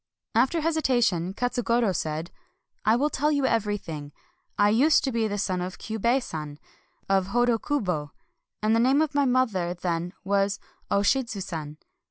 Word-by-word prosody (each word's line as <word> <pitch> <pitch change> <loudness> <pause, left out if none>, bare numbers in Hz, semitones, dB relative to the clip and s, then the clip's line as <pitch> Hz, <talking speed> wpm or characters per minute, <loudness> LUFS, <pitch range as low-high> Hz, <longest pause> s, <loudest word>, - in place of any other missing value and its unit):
After 265 +9 +2
hesitation, 240 - +1
Katsugoro 240 -2 +1
said: 160 +2 -3 0.3
— - - -48
"I 215 +2 +5
will 290 +5 +1
tell 300 +3 +1
you 285 -2 +1
everything. 205 - -2 0.4
I 205 0 +4
used 270 +9 +4
to 270 - 0
be 230 -2 0
the 205 -1 -3
son 185 -3 -1
of 180 +1 -5
Kyiibei 235 +4 0
San 150 -6 -6 0.5
of 195 -1 +2
Hodokubo, 225 - 0 0.5
and 215 +1 +3
the - - +3
name 265 +6 +4
of 310 - -3
my 285 -1 +3
mother 220 -9 +1
then 175 0 -2
was 200 0 +1 0.3
0 200 - +3
Shidzu 235 -3 0
San. 155 -4 -6
215 Hz, 160 wpm, -26 LUFS, 180-255 Hz, 0.5 s, I